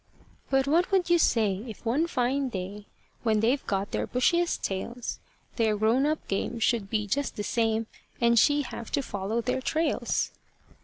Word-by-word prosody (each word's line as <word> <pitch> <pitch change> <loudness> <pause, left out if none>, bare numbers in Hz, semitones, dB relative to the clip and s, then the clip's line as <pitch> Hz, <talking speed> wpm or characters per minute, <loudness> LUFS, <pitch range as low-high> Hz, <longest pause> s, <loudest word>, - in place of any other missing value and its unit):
But 270 0 +3
what 330 +6 +2
would 370 -3 +2
you 345 - +5
say, 210 - +2
if 225 +1 -10
one 280 +9 +1
fine 265 -2 0
day, 200 0 -6 0.3
When 220 -2 +2
they've 245 +6 +2
got 195 0 -1
their - - -1
bushiest 340 +8 +1
tails, 235 +5 -3 0.4
Their 220 -3 +2
grown 230 +7 +3
up 310 0 -2
game 200 +4 -2
should 225 -3 +1
be 210 -1 0
just 280 +8 -1
the 205 - -3
same, 225 0 +1 0.3
And 235 -1 +4
she 290 +7 +4
have 235 -3 -7
to 280 - +1
follow 205 +1 -2
their 250 +2 -1
trails? 320 +5 0
235 Hz, 170 wpm, -27 LUFS, 210-280 Hz, 0.4 s, you